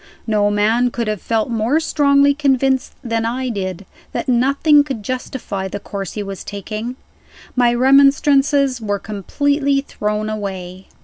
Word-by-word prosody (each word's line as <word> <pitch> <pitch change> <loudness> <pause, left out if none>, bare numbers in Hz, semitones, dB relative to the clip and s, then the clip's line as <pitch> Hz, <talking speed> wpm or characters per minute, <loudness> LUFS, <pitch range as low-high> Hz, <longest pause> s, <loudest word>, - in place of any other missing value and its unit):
No 210 -2 +2
man 220 +4 +2
could 235 -2 -3
have 215 -3 -2
felt 225 +1 -1
more 230 +7 +1
strongly 285 -2 +3
convinced 270 -2 +1
than 230 -2 -1
I 250 +3 -2
did, 190 -3 -4 0.3
that 320 - -3
nothing 280 +4 +4
could 265 -7 -5
justify 235 -5 -4
the 200 - -5
course 195 -2 -6
he 210 - -4
was 195 -1 -7
taking. 215 +4 -5 0.6
My 245 -1 +4
remonstrances 275 0 +4
were 205 -2 -1
completely 275 - 0
thrown 210 -5 -3
away. 190 -3 -6
235 Hz, 140 wpm, -18 LUFS, 205-275 Hz, 0.6 s, nothing